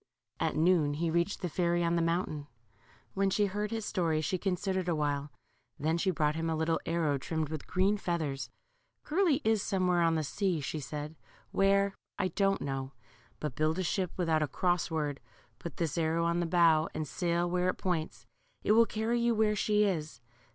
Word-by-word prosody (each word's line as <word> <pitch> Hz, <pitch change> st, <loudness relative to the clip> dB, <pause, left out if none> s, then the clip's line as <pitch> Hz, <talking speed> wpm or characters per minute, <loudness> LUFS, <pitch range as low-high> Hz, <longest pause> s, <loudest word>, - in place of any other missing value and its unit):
At -, -, 0 dB
noon 155 Hz, -3 st, +3 dB
he 165 Hz, +2 st, -1 dB
reached 170 Hz, +4 st, 0 dB
the -, -, +1 dB
fairy 175 Hz, +1 st, +1 dB
on 170 Hz, 0 st, +1 dB
the 170 Hz, -, +2 dB
mountain. 165 Hz, -3 st, -1 dB, 0.7 s
When 195 Hz, 0 st, +1 dB
she 205 Hz, +2 st, +2 dB
heard 205 Hz, +2 st, -2 dB
his 225 Hz, -2 st, -3 dB
story 165 Hz, -7 st, 0 dB
she 165 Hz, +4 st, -1 dB
considered 190 Hz, -1 st, -1 dB
awhile; 145 Hz, -3 st, -1 dB, 0.5 s
then 160 Hz, +3 st, 0 dB
she 190 Hz, -, +1 dB
brought 150 Hz, -4 st, +1 dB
him 165 Hz, +1 st, -2 dB
a 160 Hz, -, 0 dB
little 160 Hz, +1 st, 0 dB
arrow 160 Hz, -4 st, +1 dB
trimmed 160 Hz, +1 st, -2 dB
with 155 Hz, -2 st, -6 dB
green 195 Hz, +3 st, +2 dB
feathers. 160 Hz, -8 st, -2 dB, 0.5 s
Curly 315 Hz, -3 st, +2 dB
is 220 Hz, -2 st, +2 dB
somewhere 185 Hz, -3 st, +1 dB
on 165 Hz, -1 st, +3 dB
the 155 Hz, -, 0 dB
sea/' 180 Hz, +3 st, -1 dB
said 150 Hz, +1 st, -4 dB
she; 160 Hz, -, -21 dB, 0.3 s
where, 200 Hz, 0 st, +3 dB, 0.2 s
I 190 Hz, -2 st, 0 dB
don't 195 Hz, +2 st, +1 dB
know: 135 Hz, -1 st, -3 dB, 0.5 s
but 150 Hz, -5 st, -4 dB
build 155 Hz, +3 st, +1 dB
a 185 Hz, -, 0 dB
ship 185 Hz, +1 st, 0 dB
without 165 Hz, -3 st, +1 dB
a 155 Hz, -, +1 dB
cross 175 Hz, +5 st, 0 dB
word, 150 Hz, -3 st, -2 dB, 0.4 s
put 170 Hz, -, -7 dB
this 160 Hz, -4 st, -1 dB
arrow 165 Hz, +1 st, +1 dB
on 170 Hz, +1 st, +1 dB
the 175 Hz, -, 0 dB
bow, 165 Hz, -2 st, +4 dB
and 155 Hz, -1 st, -2 dB
sail 175 Hz, +1 st, 0 dB
where 180 Hz, +1 st, +1 dB
it -, -, -1 dB
points. 170 Hz, -4 st, -3 dB, 0.4 s
It -, -, +2 dB
will 230 Hz, +1 st, +6 dB
carry 225 Hz, +2 st, 0 dB
you 235 Hz, -1 st, +2 dB
where 215 Hz, -1 st, +2 dB
she 210 Hz, 0 st, +2 dB
is. 155 Hz, -, -2 dB
170 Hz, 195 wpm, -31 LUFS, 155-195 Hz, 0.7 s, will